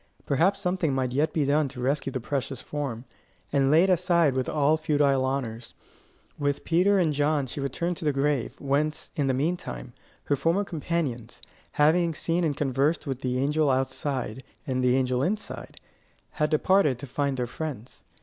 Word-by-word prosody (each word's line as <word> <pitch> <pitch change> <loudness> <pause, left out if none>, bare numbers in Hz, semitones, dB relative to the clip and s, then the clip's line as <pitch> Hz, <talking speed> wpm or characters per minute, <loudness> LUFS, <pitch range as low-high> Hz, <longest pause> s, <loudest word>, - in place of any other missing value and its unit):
Perhaps 175 +8 +2
something 180 -7 0
might 130 -1 0
yet 150 +4 +1
be 150 -3 0
done 145 +1 +2
to 130 -1 -9
rescue 135 +2 0
the 130 - -3
precious 135 +1 -3
form, 135 -5 -5 0.5
and 135 -1 +3
lay 160 +4 +6
it 190 - +2
aside 170 -4 +3
with 130 -1 -1
all 150 0 +3
futile 145 -4 +2
honours. 120 -4 -3 0.6
With 145 -1 -1
Peter 185 +5 +3
and 165 -5 +2
John 145 0 +1
she 130 - -6
returned 170 +6 -2
to 155 - -6
the 150 - +3
grave, 140 -2 -1
whence, 145 +2 -1
in 145 -2 0
the 130 - +1
mean 160 +7 0
time, - - -8 0.3
her 145 - +1
former 165 +8 +1
companions, 150 - -3 0.3
having 165 +2 +3
seen 170 +3 0
and 150 -4 0
conversed 145 +3 +1
with 135 -2 -4
the 125 -1 -1
angel 150 +3 +2
outside 130 -2 -2 0.2
and 130 -1 -1
the 125 0 +4
angel 130 -1 +1
inside, 205 +9 -4 0.5
had 150 -3 0
departed 155 -3 +3
to 125 - -7
find 140 +1 -1
their 125 - 0
friends. 130 -2 -7
145 Hz, 180 wpm, -26 LUFS, 130-160 Hz, 0.6 s, lay